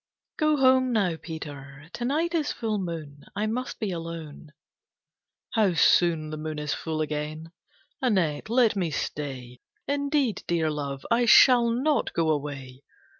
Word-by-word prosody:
III - - -65
"Go 305 -1 +2
home, 260 -1 +4
now, 195 -7 +1
Peter. 145 -3 -9
To 240 - -4
night 320 +6 0
is 310 -3 0
full 220 -3 -2
moon. 155 -6 -6
I 210 +2 -1
must 245 +4 -3
be 210 -3 -2
alone." 165 -3 -7 1.1
"How 210 -6 +2
soon 165 -2 +3
the 155 - -5
moon 155 0 -5
is 150 -1 -2
full 160 -1 -3
again! 155 +1 -4 0.5
Annette, 190 - 0
let 235 -2 +3
me 180 -4 0
stay. 130 -5 -5 0.3
Indeed, 285 -4 0
Dear 165 -2 +1
Love, 140 -2 -5
I 240 +1 +3
shall 240 0 +7
not 270 +6 0
go 160 -1 +1
away. 140 -3 -5
170 Hz, 150 wpm, -26 LUFS, 150-240 Hz, 1.1 s, shall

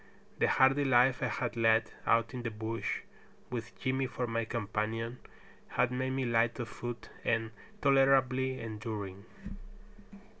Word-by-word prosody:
The - - +4
hardy 135 +2 +4
life 125 -1 +4
I - - +1
had 120 -1 -2
led 115 -1 +3 0.2
out 115 -1 +3
in 125 - -4
the 115 - -2
bush, 110 +1 -3 0.5
with 115 -2 -5
Jimmy 130 0 0
for 125 - -3
my 115 -1 -1
companion, 115 +1 -2 0.5
had 125 0 +1
made 130 +1 -1
me 130 0 -1
light 115 +1 +2
of 120 -1 -3
foot 120 -1 -6
and 115 0 0 0.3
tolerably 130 -1 +4
enduring. 105 -3 -5
120 Hz, 140 wpm, -32 LUFS, 115-130 Hz, 0.5 s, The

